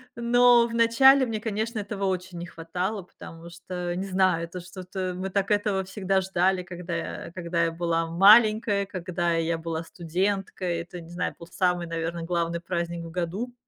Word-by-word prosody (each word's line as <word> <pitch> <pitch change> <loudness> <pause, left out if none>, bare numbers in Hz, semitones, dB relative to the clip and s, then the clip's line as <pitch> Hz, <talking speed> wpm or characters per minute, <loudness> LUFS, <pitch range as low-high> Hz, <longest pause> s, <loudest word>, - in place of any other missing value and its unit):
но 240 0 +5
в 230 - -8
начале 260 +4 +6
мне, 220 -3 -3
конечно, 220 +1 -2
этого 200 -1 -3
очень 185 -1 -3
не 175 - -5
хватало, 180 +5 -4
потому 170 -1 -12
что, 175 0 -5
не 190 - -3
знаю, 185 -3 +2
это 180 +2 -8
что-то 185 +1 -5
мы 190 +1 -4
так 200 +2 -1
этого 205 -2 +1
всегда 190 0 0
ждали, 185 0 +1
когда 175 -1 -6
я 165 - -5
когда 170 -1 -1
я 165 - -1
была 165 0 -1
маленькой, 210 +3 +5
когда 175 -2 -2
я 165 0 0
была 165 0 -4
студенткой. 180 +1 -2
Это, 175 +1 -9
не 165 - -13
знаю, 175 +1 -3
был 170 - -11
самый, 180 -1 0
наверно, 165 0 -3
главный 170 0 -1
праздник 170 -1 -3
в 165 - -8
году. 180 +8 -3
180 Hz, 175 wpm, -26 LUFS, 170-200 Hz, -, начале